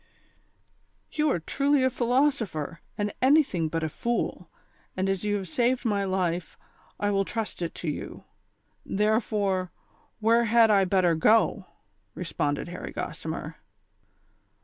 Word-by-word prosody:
" - - -42 0.3
You 305 0 +1
are 180 - +1
truly 275 - +1
a 260 - +3
philosopher, 240 - 0 0.2
and 205 -1 -1
anything 260 - +3
but 165 +1 -2
a - - +1
fool, 235 +9 -2 0.5
and 190 +1 0
as 195 0 -1
you 205 0 0
have 195 -2 -3
saved 245 +7 +1
my 200 -3 +1
life, 180 -3 -2 0.4
I 205 0 +1
will 195 -1 +2
trust 220 -2 -4
it 170 - -3
to 175 - -6
you; 150 - -5 0.6
there 215 +3 +2
fore, 195 -5 -1 0.5
where 230 +2 +3
had 230 0 +5
I 195 -2 +4
better 185 -2 +3
go 210 +3 +3
V - - -32 0.2
" 105 0 -44
responded 145 -3 -2
Harry 175 - -6
Gossimer. - - -5
205 Hz, 150 wpm, -27 LUFS, 180-235 Hz, 0.6 s, had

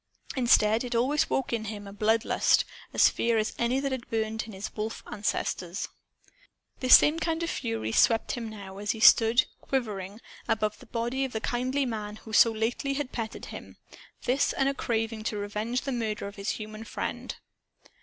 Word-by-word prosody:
Instead, 230 -3 +4
it 245 -1 -3
always 270 +6 +2
awoke 265 -2 -1
in 225 -2 -1
him 205 -1 -6
a 200 - -9
blood 220 +2 +2
lust, - - +3 0.3
as - - +6
fierce 225 -2 +1
as - - -17
any 240 +3 +1
that 275 0 -2
had 260 -2 -4
burned 220 -1 -1
in - - -8
his 195 +1 -7
wolf 215 +1 -4
ancestors. 185 -3 -3 0.9
This 255 -1 +9
same 305 +2 +2
fury 320 - -2
swept 225 - +3
him 235 -4 -4
now, 200 -2 -9
as 205 0 -1
he 220 - -8
stood, 225 +2 +6 0.2
quivering, 210 -6 -3 0.3
above 215 -2 0
the - - -15
body 240 +4 -2
of 265 - -3
the 220 - -1
kindly 255 +5 -1
man 215 -3 -4
who 220 0 -12
so 230 +2 +7
lately 235 +5 -1
had 285 -2 -3
petted 225 -2 -5
him; - - -10 0.5
this 260 +3 +1
and 270 - +1
a 275 - +1
craving 225 -3 -2
to 215 - -2
revenge 210 +4 -2
the 275 - -3
murder 220 -5 -2
of 200 0 -7
his 200 -1 -4
human 215 0 -7
friend. - - -4
225 Hz, 185 wpm, -28 LUFS, 210-250 Hz, 0.9 s, This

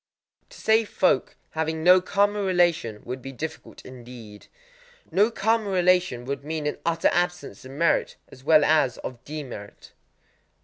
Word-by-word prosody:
_ - - -43
To - - -15
save 220 0 +2
folk 180 -8 +1 0.2
having 160 0 -2
no 180 +1 +7
karma 205 +2 +1
relation 175 - +1
would 125 +2 -6
be 135 - -8
difficult 150 +5 -8
indeed! 120 -4 -12 0.6
No 205 +4 +3
karma 225 -1 0
relation 180 -9 +2
would 140 +1 -4
mean 155 0 -4
an 150 - -3
utter 165 -1 +1
absence 175 - -2
of - - -10
merit 165 +4 +1
as 130 - -15
well 155 0 +5
as 150 -5 +2
of 125 -1 -8
demerit. 135 -9 -9
160 Hz, 150 wpm, -25 LUFS, 130-185 Hz, 0.6 s, no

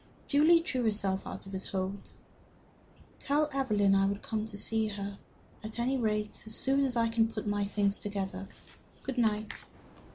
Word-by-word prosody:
Julie 315 +4 +6
drew 285 -7 -1
herself 200 -3 0
out - - -6
of 195 - -9
his 190 -1 -4
hold. 190 +1 -3 1.1
"Tell 295 +2 +2
Evelyn 210 -8 +3
I 195 0 +4
will 200 0 0
come 215 +1 -3
to 215 -2 -6
see 220 +1 +2
her, 200 -1 -5 0.4
at 215 +1 -7
any 245 +3 +1
rate, 210 -3 -1
as 220 - -3
soon 275 +1 +4
as 255 -2 -2
I 230 -1 +3
can 225 0 +2
put - - -5
my 205 -1 0
things 200 0 0
together. 195 -2 -4 0.6
Good 265 -2 -3
night." 215 -2 0
215 Hz, 170 wpm, -31 LUFS, 200-240 Hz, 1.1 s, Julie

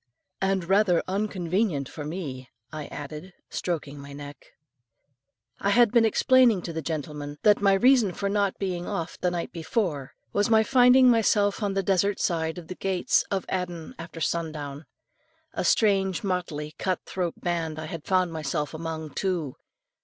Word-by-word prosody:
"And 195 -1 +1
rather 195 -2 +3
unconvenient 185 - -1
for 150 - -8
me," 145 -6 -6 0.2
I 155 -1 -5
added, 150 +5 -8 0.2
stroking 150 -5 -3
my 140 0 -10
neck. 145 -1 -10 1.1
I 200 - 0
had 235 +1 +5
been 235 -2 +5
explaining 235 -3 +4
to 170 - -5
the 160 - -3
gentleman, 150 -1 -5
that 210 -1 +5
my 200 -1 +5
reason 240 0 +4
for 200 +3 -3
not 200 -1 0
being 180 -3 -3
off 165 0 -4
the 180 - +1
night 175 -1 -4
before, 165 - -2 0.2
was 205 +1 +2
my 220 -1 +5
finding 255 +2 +6
myself 210 -2 +2
on 200 -2 -1
the 195 - +1
desert 195 +1 +1
side 160 -1 -1
of 170 -2 -9
the 185 - -5
gates 190 0 +1
of 195 -2 -1
Aden 175 -3 -4
after 165 0 -8
sun 165 0 -1
down. 145 0 -7 0.7
A - - -2
strange 195 -4 +2
motley 170 -6 -3
cut 185 -2 -1
throat 180 -3 -3
band 165 -3 -2
I 155 - -5
had 155 -1 -6
found 185 -3 +2
myself 150 -1 -2
among, 160 -1 -5
too. 165 -6 -2
180 Hz, 165 wpm, -26 LUFS, 155-200 Hz, 1.1 s, finding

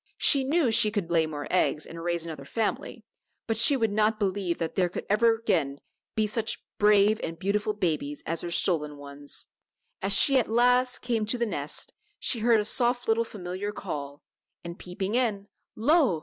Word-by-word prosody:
She 275 -2 +3
knew 285 -2 +2
she 215 -1 +4
could 205 -5 -3
lay 165 -2 +3
more 145 -2 -6
eggs 155 -4 +1
and 165 0 -9
raise 170 -1 -1
another 155 -4 -7
family, 220 +6 -3 0.4
but 225 - -1
she 235 +5 +5
would 225 -4 0
not 215 +1 +2
believe 195 -4 -1
that 165 - -3
there 180 -2 +1
could - - -6
ever 225 +2 +4
again 180 -12 -1 0.4
be 215 - +2
such 220 +1 -1 0.2
brave 210 +1 +4
and 165 0 -5
beautiful 205 +3 -1
babies 155 -7 -2
as 165 +1 -2
her 175 - -4
stolen 155 -4 +2
ones. 145 0 -7 0.6
As 195 +1 +1
she 275 -2 +5
at 240 - -2
last 250 +2 +2
came 230 -3 -1
to 245 - +1
the 235 - 0
nest, 150 -9 -4 0.2
she 235 - 0
heard 230 0 +4
a 210 - -1
soft 245 +2 +1
little 225 +1 +2
familiar 200 -2 -5
call, 145 -8 -6 0.4
and 170 0 -8
peeping 190 +3 -4
in 225 -5 0 0.3
lo! 255 - +3
205 Hz, 185 wpm, -27 LUFS, 170-230 Hz, 0.6 s, she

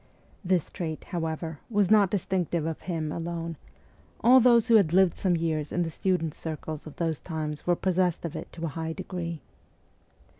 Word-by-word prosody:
This 180 -3 +1
trait, 160 -4 -4
however, 160 -3 -4
was 205 -3 +2
not 205 -3 +6
distinctive 180 -4 -1
of 160 -1 -3
him 160 -4 -3
alone; 165 0 -4 0.7
all 250 +3 +7
those 235 -2 +5
who 235 - +4
had 175 -6 +2
lived 190 -2 +5
some 185 -3 +1
years 160 -3 -1
in 175 - +1
the 165 - -3
students' 170 -3 -1
circles 155 -1 -6
of 155 - -10
those 165 -4 -1
times 155 0 -5
were 175 - +4
possessed 180 -2 0
of 165 - -5
it - - -7
*to 165 0 -5
a - - -1
high 160 +2 -4
degree. 170 -3 -5
170 Hz, 180 wpm, -27 LUFS, 160-185 Hz, 0.7 s, all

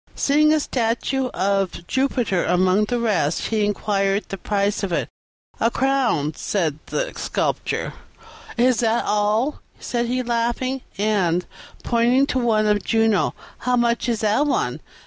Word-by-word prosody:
Seeing 305 +2 +3
a 310 - +3
statue 255 +1 -1
of 195 -5 -1
Jupiter 245 -6 0
among 185 +4 +2
the 240 +3 -1
rest, 190 -9 0
he 220 -2 +1
inquired 200 -1 0
the 195 - -4
price 205 +2 0
of 195 -3 -3
it. 170 - -1 0.5
"A 230 - +3
crown," 240 - +1
said 160 -7 -2
the - - -2
Sculptor. - - -2 0.6
"Is 245 -1 +3
that 230 0 +1
all?" 210 +7 0 0.2
said 240 -1 -2
he, 255 +1 -1
laughing; 240 +2 -1 0.2
"and" 190 -4 +1 0.4
(pointing 245 +3 +3
to 260 - +1
one 220 -3 +2
of 210 -1 +2
Juno) 225 -3 +2 0.2
"how 250 +1 +1
much 240 0 +1
is 230 -3 -1
that 220 +7 +2
one?" - - 0
225 Hz, 145 wpm, -22 LUFS, 200-250 Hz, 0.6 s, Seeing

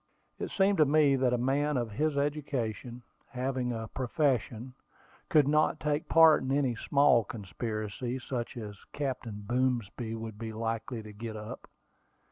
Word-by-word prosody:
It - - -3
seemed 195 -1 +2
to 155 - +7
me 145 -1 +4
that 130 -1 +2
a 125 - +2
man 140 +4 +1
of 120 -3 -2
his 150 +7 0
education, 130 -5 -2 0.3
having 130 -1 -2
a 110 -1 -4
profession, 125 -2 -1 0.6
could 150 -3 +5
not 150 +1 +2
take 150 0 -1
part 160 -1 +7
in 130 - -2
any 135 -3 +2
small 140 0 +4
conspiracy, 110 +3 -4
such 120 -2 -4
as 105 -4 -8
Captain 125 -7 -4
Boomsby 120 -2 -1
would 110 -2 -7
be 110 -1 -5
likely 115 +1 -3
to 105 0 -10
get 110 +1 -6
up. 105 0 -8
125 Hz, 150 wpm, -30 LUFS, 110-140 Hz, 0.6 s, to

